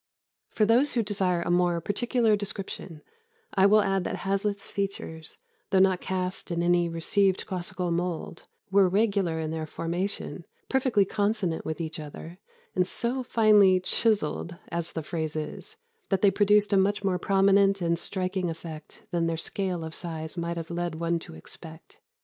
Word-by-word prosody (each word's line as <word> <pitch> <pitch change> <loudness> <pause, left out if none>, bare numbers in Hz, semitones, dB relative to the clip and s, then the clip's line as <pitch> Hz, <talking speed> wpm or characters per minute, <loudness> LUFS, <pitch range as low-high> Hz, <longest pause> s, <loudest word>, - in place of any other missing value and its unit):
"For 215 - +2
those 245 +7 +3
who 235 - +1
desire 190 -4 0
a - - -1
more 175 -1 +2
particular 225 +4 +1
description, 195 -5 -5 0.5
I 195 0 +5
will 215 +1 +6
add 195 -1 +1
that - - -4
Hazlitt's 200 +1 -1
features, 195 -5 -5 0.3
though 195 - +2
not 190 -1 +4
cast 185 0 -3
in 170 -1 -1
any 175 0 +3
received 185 +3 +1
classical 180 -1 -3
mould, 170 -1 -3 0.2
were 195 -1 +5
regular 195 -4 +1
in 160 -1 -3
their 160 -1 -3
formation, 175 +6 -4 0.3
perfectly 255 -7 +3
consonant 200 -4 -1
with 160 +1 -3
each 160 -1 -4
other, 160 +4 -9 0.4
and 180 -1 +2
so 245 +6 -1
finely 210 -6 +5
'chiseled' 180 -4 0
(as 170 -1 -3
the 160 - -3
phrase 160 -1 -3
is), 155 - -6 0.3
that 195 -1 0
they 200 - +6
produced 205 +1 +3
a - - +5
much 200 +2 +2
more 185 -2 +1
prominent 195 +1 +4
and 170 -1 0
striking 185 0 -2
effect 160 -2 -9
than 170 -1 +1
their 165 0 -1
scale 180 0 -3
of 160 0 -6
size 160 -2 -5
might 170 -1 -3
have 165 0 -5
led 175 -1 -2
one 170 +1 0
to 120 - -11
expect. 160 - -12
185 Hz, 165 wpm, -27 LUFS, 170-200 Hz, 0.5 s, will